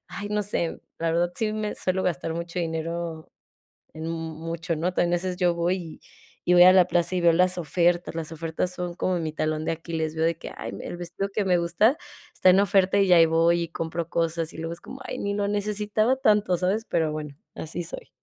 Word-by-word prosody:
ay, 205 - -4
no 210 0 0
sé, 170 -4 -2 0.2
la 165 0 0
verdad, 175 +1 +1
sí, 215 -1 -1
me 215 -1 -2
suelo 185 0 -1
gastar 165 -2 -1
mucho 170 +1 -4
dinero 165 0 -4 0.7
en 160 +1 -6
mucho, 165 0 -4
¿no?, 175 +4 -1
también 175 0 +2
a - - +3
veces 180 +1 -3
yo 175 -2 +2
voy 170 +2 +1
y 165 -4 -9 0.5
y 180 - +4
voy 175 - +9
a 185 - +9
la 185 -2 +6
plaza 175 0 0
y - - +1
veo 170 -1 +6
las 180 +2 +3
ofertas, 175 +2 +1
las 165 0 -5
ofertas 165 +2 -3
son 175 -1 -4
como 185 -1 0
mi 155 -1 -3
talón 155 0 -1
de - - 0
Aquiles, 160 -1 -3
veo 160 - +1
de 165 - 0
que - - -8
ay, - - -6
el - - -6
vestido 175 +3 -4
que 210 - +1
me 180 -1 +4
gusta 175 - +3 0.4
está 185 - +5
en 190 +2 +5
oferta 200 0 +3
y 195 -2 +4
ahí 165 -1 +8
voy 165 +1 +3
y 165 - -3
compro 165 0 -4
cosas, 165 -1 -1
y - - -12
luego 165 +1 -4
es 170 - -15
como 270 - -10
ay, - - -5
ni 200 0 -2
lo 200 0 0
necesitaba 210 +4 0
tanto, 210 -7 +3
¿sabes? 195 +5 0
Pero 160 -2 0
bueno, 150 -2 -6 0.2
así 165 +2 -5
soy. - - -8
170 Hz, 225 wpm, -25 LUFS, 165-185 Hz, 0.7 s, voy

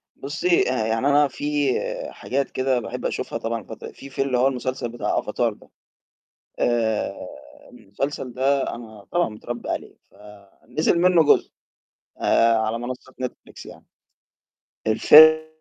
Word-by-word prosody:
بُصي 155 +1 0
آآ، 110 -4 -1
يعني 115 +5 0
أنا 145 0 +4
فيه 145 -1 -1 0.3
حاجات 140 +1 -3
كده 130 -1 0
باحب - - -6
أشوفها - - -3
طبعًا 115 0 -3
الفتر - - -10
فيه 140 - -12
في 135 - -3
اللي 130 -2 0
هو 130 +2 +4
المسلسل 130 -2 -3
بتاع 120 - -2
Avatar - - -1
ده، - - -20 0.9
آآ، 115 -3 0 0.6
المسلسل 125 +5 -5
ده 135 +2 +1
أنا 110 -4 -11
طبعًا 175 0 +2
متربي 120 +2 -7
عليه - - -5
ف - - -28 0.5
نزل 160 +2 +1
منه 175 -2 +4
جزء. - - +3 0.7
آآ، 115 0 +4
على 110 +1 -1
منصة 130 +2 -7
Netflix 125 - -8
يعني. - - -13 1.0
الفي 155 +7 +7
130 Hz, 140 wpm, -23 LUFS, 115-145 Hz, 1.0 s, الفي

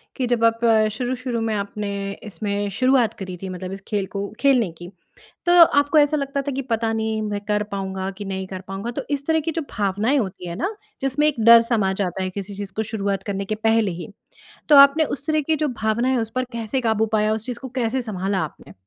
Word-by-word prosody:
कि 255 - -1
जब 235 -1 +1
आप 230 0 +3 0.3
शुरू-शुरू 245 0 -3
में 225 -1 -1
आपने 200 0 -3 0.3
इसमें 205 -1 -3
शुरुआत 255 -4 +3
करी 185 -2 -5
थी 190 - -5
मतलब 185 0 -6
इस 195 0 -7
खेल 205 -3 -1
को 200 0 -3
खेलने 250 -10 +3
की 175 - -9 0.6
तो 350 - +3 0.3
आपको 285 +2 +2
ऐसा 300 +1 +4
लगता 275 0 -2
था 285 0 -3
कि 270 +1 -2
पता 225 -3 -1
नहीं 220 0 -1
मैं 210 -1 -2
कर 210 0 0
पाऊँगा 190 -1 -3
कि 205 - -6
नहीं 190 -1 -4
कर 185 -1 -7
पाऊँगा? 195 +5 -4
तो - - -4
इस 280 0 -1
तरह 320 0 +3
की 325 - 0
जो 330 - -2
भावनाएँ 210 +6 0
होती 190 -6 -3
है 170 - -5
ना 395 - -2 0.3
जिसमें 270 +3 +1
एक 280 -6 -1
डर 230 0 +9
समा 220 -5 +1
जाता 190 -1 -2
है 185 - -2
किसी 200 +1 -6
चीज़ 200 -1 -6
को 220 - 0
शुरुआत 200 -3 -2
करने 200 -1 -3
के 215 - -2
पहले 225 -2 +2
ही, 170 0 -7 0.6
तो 295 - +8
आपने 280 +3 +8
उस 280 0 -5
तरह 310 -1 +2
की 315 +2 0
जो 305 -1 0
भावनाएँ 235 +4 +1
उस 225 - -3
पर 255 - +1
कैसे 235 +3 -2
काबू 220 -1 +2
पाया 215 0 +3
उस 220 0 -3
चीज़ 245 -2 -5
को 260 - -7
कैसे 245 +2 0
सँभाला 195 -3 -2
आपने? 120 -10 -10
220 Hz, 230 wpm, -22 LUFS, 200-260 Hz, 0.6 s, डर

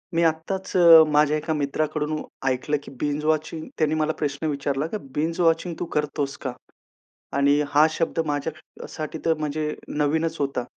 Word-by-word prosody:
मी 170 - +3
आत्ताच 165 +5 -1
अ, 165 -2 +9
माझ्या 150 0 +4
एका 155 +1 -2
मित्राकडून 150 +1 -1 0.3
ऐकलं, 130 +3 0
की - - -11
बिंज 150 0 -1
वॉचिंग 155 +1 -1
त्यांनी 155 -1 +1
मला 155 0 +1
प्रश्न 145 +1 -2
विचारला, 140 -1 -1
की 215 - -4 0.2
"बिंज 160 +3 -1
वॉचिंग 165 +1 +2
तू - - -2
करतोस 145 -2 -1
का?" 130 - -1 0.9
आणि 140 +1 +4
हा 150 +2 +5
शब्द 165 +1 -1
माझ्यासाठी 155 +1 -5
तर 165 - +3
म्हणजे 150 0 -2 0.2
नवीनच 160 +2 +1
होता. 140 -3 -1
155 Hz, 155 wpm, -24 LUFS, 145-160 Hz, 0.9 s, अ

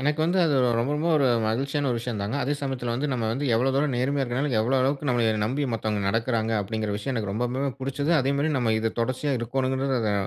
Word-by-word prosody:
எனக்கு 150 +3 0
வந்து 175 +3 +1
அது 150 - +2 0.2
ரொம்ப 125 +5 0
ரொம்ப 160 +3 0
ஒரு 140 -3 +3 0.2
மகிழ்ச்சியான 135 +5 0
ஒரு 120 - 0
விஷயந்தாங்க. 110 -1 -3
அதே 140 - 0
சமயத்தில 130 -4 -2
வந்து 135 +5 -1
நம்ம 120 -3 -1
வந்து 135 +5 -2
எவ்வள 125 +4 +2
தூரம் 140 -1 +1
நேர்மையா 135 +3 0
இருக்கனால, 130 +4 -1
எவ்ளோ 120 +5 +1
அளவுக்கு 140 +2 0
நம்மள 120 -2 +2 0.2
நம்பி 130 +7 -1
மத்தவங்க 110 -2 -1
நடக்கிறாங்க, 115 0 0
அப்டிங்கிற 110 +1 -3
விஷயம் 115 +6 -3
எனக்கு 105 -4 -2
ரொம்பவுமே 125 +5 -1
புடுச்சது. 140 +4 -1
அதேமாரி 140 +3 0
நம்ம 115 -3 +1
இத 115 0 -1
தொடர்ச்சியா 130 +4 -1
இருக்கோணுங்கிறது 130 +2 -1
அத 105 -2 0
130 Hz, 205 wpm, -25 LUFS, 115-140 Hz, 0.2 s, ஒரு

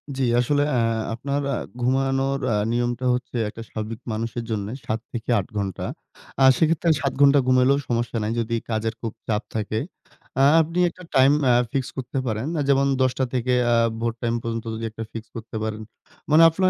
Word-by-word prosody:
জি, 135 - -1 0.2
আসলে 145 +4 +2
আ - - +3 0.3
আপনার 140 +5 -2
আ - - 0 0.3
ঘুমানোর 135 +2 +1
আ - - +2 0.2
নিয়মটা 120 +1 -1
হচ্ছে, 125 0 -4
একটা 115 - -9
স্বাভাবিক 110 +1 -5
মানুষের 115 +2 -3
জন্যে 105 -1 -2
৭-৮ 115 -2 -2
ঘণ্টা। 100 -3 -3 0.6
আ - - +7
সেক্ষেত্রে 165 +1 +2
৭ 140 -2 0
ঘন্টা 140 0 +7
ঘুমাইলেও 130 +2 +4
সমস্যা 120 0 -1
নাই। 105 - -1
যদি 115 0 -1
কাজের 110 0 -1
খুব 115 -2 -4
চাপ 110 0 0
থাকে। 110 0 -1 0.6
আ - - +6 0.2
আপনি 165 +3 -2
একটা 180 +2 -14
টাইম 130 +1 +6 0.2
আ - - +5 0.2
ফিক্স 135 -2 -1
করতে 130 +1 -4
পারেন। 110 +3 -2
আ - - +2
যেমন 140 0 +4
১০:০০ 130 0 +2
থেকে 125 0 +1 0.2
আ - - +5 0.3
ভোর 115 0 0
টাইম 115 -1 0
পর্যন্ত 115 0 -4
যদি 115 +1 -4
একটা 110 +1 -6
ফিক্স 115 -1 -7
করতে 115 0 -8
পারেন। 110 0 -3 0.5
মানে 160 +2 +7
আপনার 185 +3 +2
120 Hz, 180 wpm, -23 LUFS, 115-135 Hz, 0.6 s, আ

